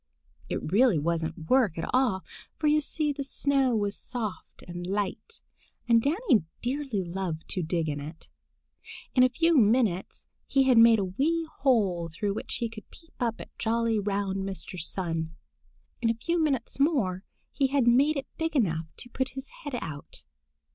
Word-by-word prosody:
It - - -3
really 225 -2 +5
wasn't 160 +1 -2
work 235 -9 +3
at 165 - -3
all, 250 -8 +2 0.3
for 310 - -3
you 300 0 +4
see 300 0 0
the 280 0 -4
snow 275 -2 +1
was 205 -2 0
soft 225 -6 -5
and 175 0 -6
light, 200 - -3 0.5
and 230 -1 +5
Danny 290 - +2 0.2
dearly 255 -5 -1
loved 175 -2 -4
to 185 - -1
dig 165 0 -1
in 145 -1 -2
it. 155 +3 -9 0.9
In 255 - +4
a 255 - +6
few 330 +6 +2
minutes 215 - +2 0.2
he 270 - +3
had 255 -3 +5
made 230 0 +8
a 200 - 0
wee 315 - 0
hole 200 -11 +2
through 200 +5 -2
which - - -4
he 235 - -1
could 220 -2 -11
peep 330 -1 -18
up 235 -3 -1
at - - -11
jolly, 230 -1 +1
round 200 -1 -1
Mr. 190 -1 -5
Sun. 165 -1 -3 0.7
In 230 - +2
a 230 - +1
few 335 +9 -1
minutes 270 -4 -1
more 230 - +1 0.3
he 275 - +1
had 270 -2 +2
made 280 +6 +4
it 275 - -3
big 325 -1 -1
enough 165 - +1
to 245 - -7
put 260 +2 -3
his 270 - -6
head 285 -3 -4
out. 145 -2 -8
230 Hz, 175 wpm, -28 LUFS, 185-270 Hz, 0.9 s, made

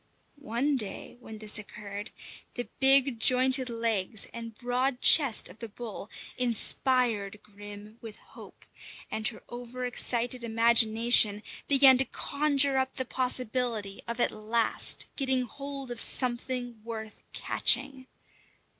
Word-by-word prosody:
One 270 +5 -1
day 210 -5 -5
when 220 -3 -11
this 215 0 -1
occurred, 205 0 -9 0.5
the 245 - -5
big 270 -2 +3
jointed 255 +1 +2
legs 225 -3 -1
and 230 -1 -9
broad 250 +1 -2
chest 275 -7 +6
of 180 +5 -16
the 230 - -8
bull 215 -1 -9 0.3
inspired 235 -3 0
Grim 205 +1 -13
with 225 -2 -10
hope, - - -16 0.5
and 220 0 +1
her 220 - -5
over 245 +1 -8
excited 245 0 -1
imagination 225 -2 +3 0.2
began 270 -2 +5
to 270 - +2
conjure 285 -1 +1
up 265 0 -3
the 260 - -4
possibility 250 -5 -1
of 235 +1 -5
at - - +1
last 225 +2 0
getting 265 -2 0
hold 275 +1 -8
of 240 - -4
something 245 -2 0
worth 220 -1 -9
catching. 260 +1 +1
240 Hz, 125 wpm, -27 LUFS, 220-260 Hz, 0.5 s, chest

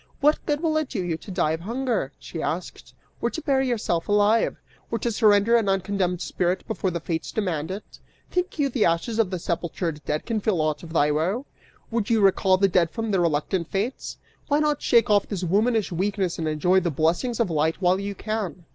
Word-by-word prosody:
'What 295 +2 +3
good 295 0 0
will 315 -2 +1
it 310 -3 -1
do 195 -7 -2
you 175 -2 -1
to 200 - -13
die 180 -4 +1
of 160 - -2
hunger?' 230 - -2
she 165 - -7
asked, 180 +3 -5 0.3
'or - - +1
to - - -5
bury 270 -4 +1
yourself 210 -9 -1
alive'? 210 +2 +3 0.3
Or 230 - -1
to 235 +2 -1
surrender 210 0 +4
an 225 -4 +2
uncondemned 190 -2 0
spirit 180 +1 -1
before 220 -4 -1
the 170 -1 -3
fates 165 0 -3
demand 175 -7 -2
it? 195 +3 -5 0.5
'Think 360 -1 -1
you 290 -2 +2
the 240 -4 +1
ashes 170 +7 0
or 225 - +5
sepultured 170 -3 -3
dead 150 +2 -2
can 225 -2 -1
feel 200 -4 0
aught 155 -1 0
of 170 - -10
thy 150 -2 +3
woe! 185 - 0 0.5
Would 225 -3 -1
you 230 -1 +3
recall 190 -1 +4
the 195 +1 +4
dead 175 -3 +2
from 225 +4 -3
the 195 - +2
reluctant 170 +1 0
fates? 210 +9 -3 0.3
Why 290 - +2
not 300 -1 +1
shake 230 -3 +3
off 205 -1 +3
this 195 -3 -4
womanish 215 +4 +1
weakness 190 0 -1
and 160 - -1
enjoy 165 +5 +3
the 175 -2 -1
blessings 170 - 0
of 220 -7 +1
light 160 +1 +1
while 185 0 +2
you 200 0 -4
can? 210 -6 -4
195 Hz, 210 wpm, -24 LUFS, 170-225 Hz, 0.5 s, or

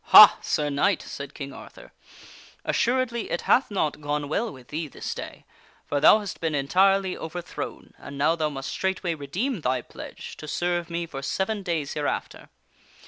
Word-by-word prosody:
" - - -44
Ha! - - +12
Sir 150 -1 0
Knight," 175 +7 +2
said 140 0 -7
King 140 -2 -6
Arthur, - - -12 0.7
"assuredly 240 -2 +1
it 170 - -1
hath 265 - +3
not 155 -7 -1
gone 145 0 -2
well 220 +10 -1
with 130 -3 -14
thee 155 +1 -3
this - - -5
day, - - -8 0.4
for 145 - 0
thou 155 - +8
hast 205 -3 -6
been 160 -2 0
entirely 190 +6 +3
overthrown 170 +2 -6
and 140 +1 -9
now 150 +4 +3
thou 155 -2 0
must 135 -2 -5
straightway 190 -2 -1
redeem 180 - -3
thy 130 -2 +1
pledge - - -9
to 155 - -8
serve 175 +2 -1
me 170 0 -2
for 140 -4 -7
seven 195 +8 -1
days 165 -6 -2
hereafter. 145 -1 -3
160 Hz, 175 wpm, -26 LUFS, 145-190 Hz, 0.7 s, Ha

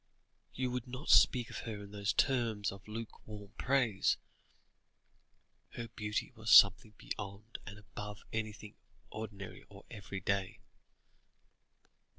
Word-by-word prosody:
You 130 -1 -1
would 125 -1 -3
not 130 +5 -7
speak 125 -3 +6
of - - -5
her 105 -3 -6
in 100 - -11
those 100 -1 0
terms 115 -6 +1
of 100 0 -12
lukewarm 105 -2 -8
praise. 125 -7 +2 1.6
Her 115 -1 -6
beauty 105 0 -3
was 110 -1 -3
something 105 +2 +8
beyond 105 +2 -7
and 100 +1 -8
above 105 0 -8
anything 110 -2 -4 0.4
ordinary 105 -3 -7
or - - -14
everyday." 100 -1 -2
105 Hz, 115 wpm, -34 LUFS, 100-115 Hz, 1.6 s, something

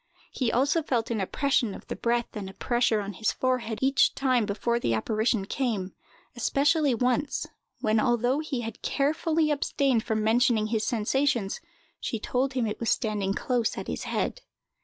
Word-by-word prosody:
He 250 -4 0
also 280 +7 +2
felt 240 -6 -1
an 220 -3 0
oppression 240 0 0
of - - -11
the - - -5
breath 235 0 -1
and 200 -3 -5
a 190 - -13
pressure 240 -3 +1
on 200 0 -5
his 215 +4 0
forehead 250 -4 -1
each 270 +1 +3
time 255 -5 +2
before 235 +3 0
the 115 - +1
apparition 215 - 0
came, 210 -6 -2 0.4
especially 280 +3 +2
once, 250 +4 0 0.4
when, 215 0 +2
although 245 +3 +2
he 305 -5 -3
had 225 -2 -7
carefully 310 +2 +1
abstained 275 -4 +1
from 220 -2 -1
mentioning 230 0 +3
his 220 -1 0
sensations, 235 -1 0 0.4
she 225 - -3
told 260 +5 -1
him 255 -3 0
it 210 - -3
was 230 - -1
standing 205 -3 0
close 240 -3 0
at - - -4
his - - -4
head. - - -2
240 Hz, 170 wpm, -27 LUFS, 215-270 Hz, 0.4 s, each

